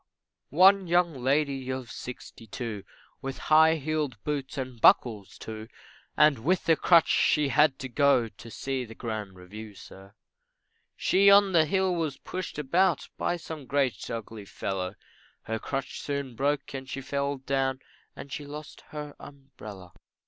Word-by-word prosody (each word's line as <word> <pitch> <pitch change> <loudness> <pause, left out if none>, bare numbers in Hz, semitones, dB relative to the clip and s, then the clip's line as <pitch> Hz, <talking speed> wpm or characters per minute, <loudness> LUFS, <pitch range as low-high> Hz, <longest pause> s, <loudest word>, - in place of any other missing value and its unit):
One 190 +4 +5
young 175 -1 +3
lady 135 0 0
of 130 -2 -4
sixty 120 -2 -9
two, 110 -2 -5 0.4
With 135 0 -5 0.2
high 160 +1 +7
heeled 150 -4 -2
boots 145 -3 -3
and 130 -3 -5
buckles, 105 -6 +4
too, 110 0 -8 0.5
And 150 -4 +5
with 165 +7 0
a 165 - +7
crutch 170 0 +5
she 150 -2 +3
had 145 +1 +4
to 135 - -6
go 130 -2 +3
To 115 +1 -13
see 135 +2 -3
the 115 -2 -11
grand 110 -5 -5
review, 105 +4 -10
sir, 95 +1 -14 0.8
She 200 +2 +4
on 200 0 +6
the 165 -3 +5
hill 190 +3 +1
was 160 -5 -2
pushed 185 -4 -6
about 170 +7 +1
By 175 - 0
some 160 -4 -8
great 140 -3 0
ugly 110 -2 -6
fellow, 95 -1 -4 0.5
Her 110 0 -3
crutch 135 +2 -4
soon 140 -3 -3
broke 145 +2 -1
and 130 -1 -6
she 135 - -4
fell 140 +1 -2
down, 135 0 -1 0.4
And 140 - -10
she 150 - -5
lost 145 +1 -9
her 150 -1 -7
umbrella. 110 -10 -12
135 Hz, 155 wpm, -28 LUFS, 115-150 Hz, 0.8 s, high